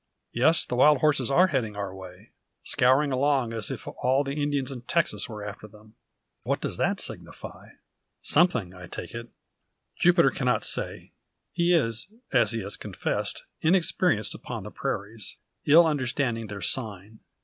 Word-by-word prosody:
Yes, 160 +8 +3
the - - -6
wild 145 +4 +6
horses 140 -5 +2
are 175 +7 +5
heading 115 - -2
our 100 -2 -4
way; 95 +2 -12 0.3
scouring 135 +3 +3
along 130 -3 +1
as 110 -3 -1
if - - -7
all 130 +3 0
the 140 0 -4
Indians 145 -2 -1
in 125 -3 -7
Texas 165 +2 -1
were 105 -2 -7
after 105 +1 -8
them. 105 +1 -18 0.5
What - - -1
does - - -4
that - - 0
signify? - - -5 0.5
Something, 125 - +2
I 90 -1 -11
take 90 +2 -7
it." 120 0 -7 0.7
Jupiter 170 -5 +4
cannot 125 -1 0
say. - - -2 0.4
He 170 0 +1
is, 120 -8 +1 0.3
as 120 -4 +4
he 115 0 -1
has 100 +1 -4
confessed, - - -3 0.2
inexperienced 165 - +2
upon - - -7
the - - -8
prairies, 105 +1 -4 0.3
ill 165 +4 +7
understanding 130 -6 -1
their 100 0 -7
"sign." 105 0 -1
125 Hz, 155 wpm, -26 LUFS, 105-145 Hz, 0.7 s, ill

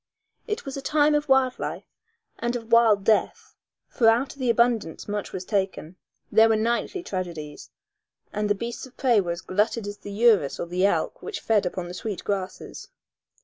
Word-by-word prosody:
It 430 +1 -3
was 275 - -5
a 275 - -5
time 300 +1 +3
of 295 -1 0
wild 265 -1 +3
life, - - -4 0.5
and 240 +1 -1
of 230 -1 -6
wild 225 -4 +5
death, 215 +1 0 0.3
for 230 - +1
out 240 +4 +1
of 280 - -20
the 255 -2 0
abundance 235 -7 +1
much 205 -1 -4
was 185 0 -6
taken; 190 -4 -2 0.4
there 225 0 +6
were 220 - +4
nightly 235 - -1
tragedies, 170 - -6 0.6
and 210 0 -1
the 205 - +3
beasts 235 +4 -6
of 255 - -22
prey 240 -6 +3
were 175 - -5
as 170 - -8
glutted 210 +3 0
as 205 0 -6
the - - -9
urus 205 -9 +3
or - - -2
the 180 +3 +1
elk - - -1
which 435 - -5
fed 205 -5 +1
on 175 -1 -3
the 175 - -7
sweet 200 +1 -5
grasses. 190 -2 -5
220 Hz, 190 wpm, -25 LUFS, 195-240 Hz, 0.6 s, there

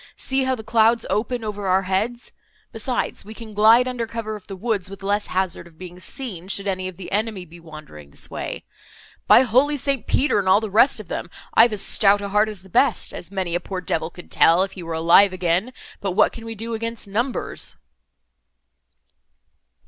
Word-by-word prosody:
See 265 0 0
how 260 0 +1
the 220 - -9
clouds 225 +1 +3
open 240 +3 -1
over 205 -2 -4
our 190 +1 +3
heads. 215 +6 -2 0.4
Besides, 240 +3 -3
we 220 +2 -11
can 220 -2 -10
glide 225 +4 +5
under 245 -2 -3
cover 225 -1 -5
of 210 - -12
the 195 - -7
woods 200 -1 -2
with 195 0 -11
less 205 +1 0
hazard 185 -2 -2
of 165 -2 -20
being 180 0 -10
seen, 185 -2 -3
should 200 0 -1
any 185 -2 -2
of 185 - -9
the 190 - -9
enemy 210 -2 -1
be 170 +1 -14
wandering 155 - -12
this - - -8
way. - - -6 0.6
By - - +8
holy 260 +5 +2
St. 275 -4 -2
Peter 275 -6 +2
and 190 -2 0
all 195 - +6
the 220 -2 -5
rest 230 +4 +4
of 210 - -9
them, - - -5 0.2
I've 230 +1 +6
as 210 -2 0
stout 205 -1 +4
a 200 0 -5
heart 210 +2 +2
as 205 -4 -8
the - - -15
best, 230 +4 +1
as 175 - -7
many 190 -3 -3
a 175 - +1
poor 185 +1 -5
devil 160 -2 -2
could 175 0 -14
tell, 170 +3 +5
if 195 - -4
he 190 - -9
were 165 -1 -5
alive 170 +4 +5
again—but 185 +3 -2
what - - +4
can 230 - -10
we 225 0 -6
do 225 +2 -5
against 230 -1 -4
numbers?" 235 +6 -3
205 Hz, 205 wpm, -22 LUFS, 185-230 Hz, 0.6 s, By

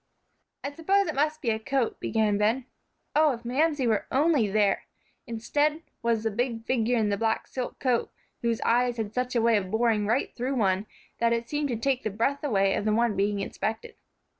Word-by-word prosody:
"I 280 - -3
suppose 390 +6 +2
it 315 - -2
must 300 +2 0
be 235 - +2
a 220 - -1
coat," 260 +1 -1
began 215 -2 +1
Ben. 225 +5 +1 0.5
Oh, 305 -2 +5
if 235 0 -9
Mamsie 290 +2 +1
were 220 -3 +1
only 285 -4 +3
there! 205 -1 +2 0.4
Instead, 290 +7 0 0.2
was 230 -2 +1
the 225 - 0
big 230 +1 -2
figure 245 -1 +1
in 215 -2 +1
the 200 - 0
black 225 +1 0
silk 255 -2 -5
coat, 250 -3 0 0.3
whose 230 -1 0
eyes 245 0 +2
had 215 -2 -3
such 250 0 -2
a 235 - +3
way 230 -1 +4
of 190 -2 -3
boring 220 -1 +1
right 230 +5 0
through 255 +3 -2
one 195 -3 +1 0.3
that 235 0 +3
it 235 0 -2
seemed 295 -1 -1
to 240 - 0
take 265 +2 0
the 220 - -2
breath 235 +8 -1
away 195 -8 +2
of - - -1
the 215 - +2
one 230 -2 +2
being 200 +1 0
inspected. 220 +3 -4
235 Hz, 205 wpm, -27 LUFS, 220-270 Hz, 0.5 s, Oh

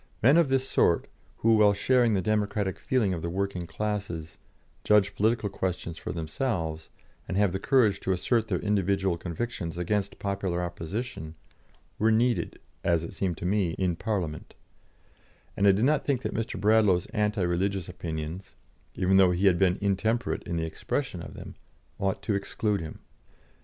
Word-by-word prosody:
Men 135 +6 +7
of 170 -3 +5
this 135 0 +1
sort, 85 - +3 0.3
who, 115 0 +4
while 105 -1 +6
sharing 120 +1 +3
the 95 - 0
democratic 105 -1 0
feeling 115 -8 +1
of 85 - -4
the 85 - -3
working 95 -1 -2
classes, 95 -6 -4 0.4
judge 105 -1 +4
political 110 +1 +1
questions 90 -3 -3
for - - -5
themselves, 80 -1 -3 0.4
and 95 - -2
have 100 -2 +3
the 95 - -1
courage 110 -7 +3
to 95 - -2
assert 110 +5 +1
their 95 -4 0
individual 100 -3 +1
convictions 85 0 -4
against 100 +3 -1
popular 95 -3 -2
opposition, 85 0 -5 0.6
were 110 +1 +4
needed, 120 +2 +1 0.2
as 85 -1 +2
it 85 - -7
seemed 90 -4 -2
to - - -6
me, 95 -3 +1
in 90 -3 0
Parliament; 90 -6 -3 1.0
and 100 - +3
I - - +8
did 100 +5 +2
not 150 +1 +2
think 135 -3 0
that - - -2
Mr. 115 -3 -3
Bradlaugh's 105 -3 +4
anti 105 -2 +1
religious 90 +1 0
opinions 80 0 -6 0.4
(even 95 +1 +3
though 95 -1 +6
he 90 +3 +1
had 90 -3 +4
been 95 -1 +3
intemperate 110 +4 0
in 85 -2 -2
the 80 - -1
expression 80 - -3
of - - -9
them) - - -9 0.5
ought 95 0 -1
to 110 - 0
exclude 100 0 -1
him." 80 - -8
100 Hz, 170 wpm, -27 LUFS, 85-105 Hz, 1.0 s, I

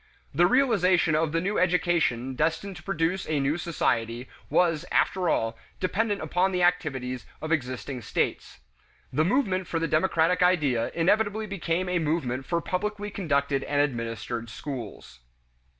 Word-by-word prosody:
The 175 +5 +5
realization 190 - +3
of 155 0 +1
the 165 - +1
new 195 +5 -1
education 170 -8 +1
destined 165 +8 -1
to - - -11
produce 175 -1 -1
a 155 -2 +1
new 140 +5 0
society 120 -8 -1 0.2
was, 165 -3 +2
after 185 -3 +2
all, 115 -4 0 0.2
dependent 205 +1 0
upon 180 +5 +1
the 180 -1 0
activities 130 -8 0
of 155 - -5
existing 130 -3 -2
states. 80 - -2 0.5
The 150 +4 +3
movement 190 - +1
for 165 - -2
the 165 0 0
democratic 165 +1 +2
idea 150 -10 +2
inevitably 205 +5 +2
became 185 -2 -2
a 180 -1 +1
movement 150 -5 -1
for 170 -1 0
publicly 205 +3 -3
conducted 140 -7 0
and 145 0 0
administered 115 -3 -2
schools. 115 - -7
165 Hz, 145 wpm, -27 LUFS, 135-185 Hz, 0.5 s, The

